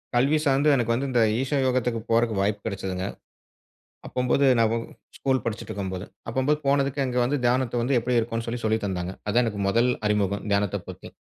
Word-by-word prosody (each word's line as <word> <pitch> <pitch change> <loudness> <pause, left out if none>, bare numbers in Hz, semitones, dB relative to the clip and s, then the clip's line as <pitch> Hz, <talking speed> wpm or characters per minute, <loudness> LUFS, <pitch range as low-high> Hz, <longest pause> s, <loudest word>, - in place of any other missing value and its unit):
கல்வி 140 +5 +3
சார்ந்து 140 +2 +3
எனக்கு 115 -3 +1
வந்து 135 +4 -1
இந்த 120 -2 +3 0.2
ஈஷா 135 +2 0
யோகத்துக்கு 125 -2 0
போறதுக்கு 115 -1 +2
வாய்ப்பு 100 +1 0
கிடைச்சுதுங்க. 95 -2 -3 1.0
அப்பும்போது 125 +2 +1
நான் 115 -1 +3 0.4
ஸ்கூல் 130 -1 +1
படிச்சுட்டு 115 -1 -4
இருக்கும்போது, 95 -1 -4 0.2
அப்பும்போது 130 +5 +1
போனதுக்கு 140 0 +1
அங்க 125 -1 -2
வந்து 140 +4 +1
தியானத்த 120 -1 +1
வந்து 130 +2 +2
எப்டி 120 +1 +1
இருக்கும்னு 115 0 -3
சொல்லி 120 +1 -3
சொல்லி 110 0 +2
தந்தாங்க. 90 -1 -3
அதான் 120 +4 +3
எனக்கு 105 -3 -3
முதல் 115 +5 +3 0.2
அறிமுகம் 100 -1 0
தியானத்தைப் 100 -1 0
பத்தி. - - -9
115 Hz, 170 wpm, -25 LUFS, 105-130 Hz, 1.0 s, கல்வி